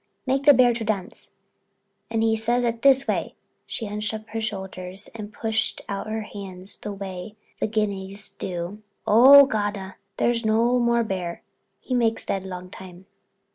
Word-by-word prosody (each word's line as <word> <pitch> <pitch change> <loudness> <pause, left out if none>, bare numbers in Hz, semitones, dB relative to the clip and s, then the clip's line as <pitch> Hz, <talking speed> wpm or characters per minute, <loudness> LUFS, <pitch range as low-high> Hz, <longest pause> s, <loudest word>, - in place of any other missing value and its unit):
Make 270 +1 0
the 290 - +9
bear 245 -1 +5
to 230 -1 -4
dance.' 210 -4 -4 0.8
And 225 -1 0
he 225 0 +3
says 240 +2 0 0.2
this 270 0 +5
way"—she 225 - -5
hunched 210 +1 -3
up 215 0 -8
her 225 - -3
shoulders 190 -2 -5
and 210 -2 -7
pushed 220 +1 -1
out 200 +1 -4
her 220 0 -2
hands 195 -2 -8
the 210 - -6
way 195 +1 -7 0.2
the - - +1
Guineas 200 -2 -3
do—"'Oh, 210 +9 +5
Gawda, 205 -5 -3 0.2
there 240 - +3
is 235 0 -2
no 230 +3 +3
more 235 -1 +2
bear; 180 -5 -4 0.4
he 255 - -5
makes 230 -2 +1
dead 190 -1 -2
long 180 -1 -7
time.'" 185 -1 -11
215 Hz, 155 wpm, -24 LUFS, 195-230 Hz, 0.8 s, the